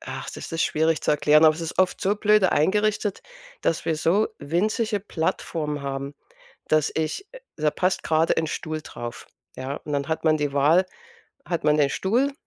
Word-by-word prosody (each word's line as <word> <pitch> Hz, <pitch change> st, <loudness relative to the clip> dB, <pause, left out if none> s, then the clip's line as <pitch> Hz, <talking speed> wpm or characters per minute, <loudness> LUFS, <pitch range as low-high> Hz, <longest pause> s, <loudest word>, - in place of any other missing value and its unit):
ach, -, -, -6 dB
das -, -, -8 dB
ist 165 Hz, -, 0 dB
schwierig 160 Hz, +1 st, +1 dB
zu -, -, +1 dB
erklären, 150 Hz, +1 st, +5 dB
aber 155 Hz, -1 st, +6 dB
es -, -, -7 dB
ist 165 Hz, -1 st, -5 dB
oft 185 Hz, -1 st, +2 dB
so 200 Hz, +2 st, +1 dB
blöde 210 Hz, -2 st, +3 dB
eingerichtet, 210 Hz, +4 st, +1 dB, 0.4 s
dass 165 Hz, -, 0 dB
wir 160 Hz, -, 0 dB
so 185 Hz, +7 st, +2 dB
winzige 205 Hz, +6 st, 0 dB
Plattformen 160 Hz, -5 st, -3 dB
haben, 140 Hz, +1 st, -4 dB, 0.5 s
dass 155 Hz, -1 st, +2 dB
ich 160 Hz, -, -2 dB, 0.3 s
da 155 Hz, -1 st, +2 dB
passt 185 Hz, +3 st, 0 dB
grad 160 Hz, +1 st, +2 dB
ein 160 Hz, -, +1 dB
Stuhl 155 Hz, 0 st, -4 dB
drauf, 120 Hz, -4 st, -8 dB, 0.3 s
ja? 130 Hz, +2 st, -4 dB
Und 150 Hz, -, -4 dB
dann 140 Hz, -1 st, -1 dB
hat 160 Hz, -, -2 dB
man 155 Hz, -1 st, +3 dB
die 145 Hz, -1 st, -1 dB
Wahl: 155 Hz, +6 st, +4 dB, 0.6 s
Hat 170 Hz, -3 st, -3 dB
man 150 Hz, 0 st, +4 dB
den 145 Hz, -2 st, +3 dB
Stuhl 245 Hz, -, +1 dB
160 Hz, 185 wpm, -24 LUFS, 150-190 Hz, 0.6 s, aber